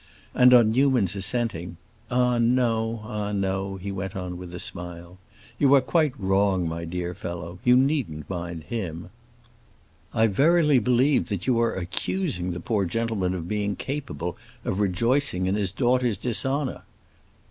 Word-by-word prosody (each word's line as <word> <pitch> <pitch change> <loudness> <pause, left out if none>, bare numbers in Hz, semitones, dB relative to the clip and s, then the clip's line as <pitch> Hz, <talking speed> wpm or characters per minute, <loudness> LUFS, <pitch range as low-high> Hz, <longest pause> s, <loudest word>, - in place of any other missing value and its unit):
And 125 0 +6
on 120 -3 +6
Newman's 125 -7 +2
assenting, 100 -5 -2 0.3
"Ah 125 -1 +2
no, 115 -2 +1
ah 105 -1 -4
no," 95 -1 -1
he 95 +1 -5
went 95 0 -5
on 90 -1 -4
with 90 0 -8
a 90 - -6
smile. 85 +1 -7 0.4
"You 140 -1 +6
are 135 - +5
quite 150 -1 +1
wrong, 95 -2 +2
my 85 +1 -4
dear 90 +1 -4
fellow; 85 0 -7
you 125 0 +5
needn't 130 - 0
mind 85 -3 -5
him." 85 -3 -5 1.0
"I 115 -1 +3
verily 150 - +4
believe 125 +5 +2
that 100 -4 -3
you 125 -3 +2
are 115 - +1
accusing 95 - -2
the 85 -1 -4
poor 100 +2 0
gentleman 100 -2 -1
of 85 -2 -5
being 105 0 -1
capable 135 - -4 0.3
of 95 - -1
rejoicing 105 +1 +1
in 95 - +1
his 100 -3 0
daughter's 125 -1 +1
dishonor." 135 +5 -1
105 Hz, 150 wpm, -25 LUFS, 90-125 Hz, 1.0 s, And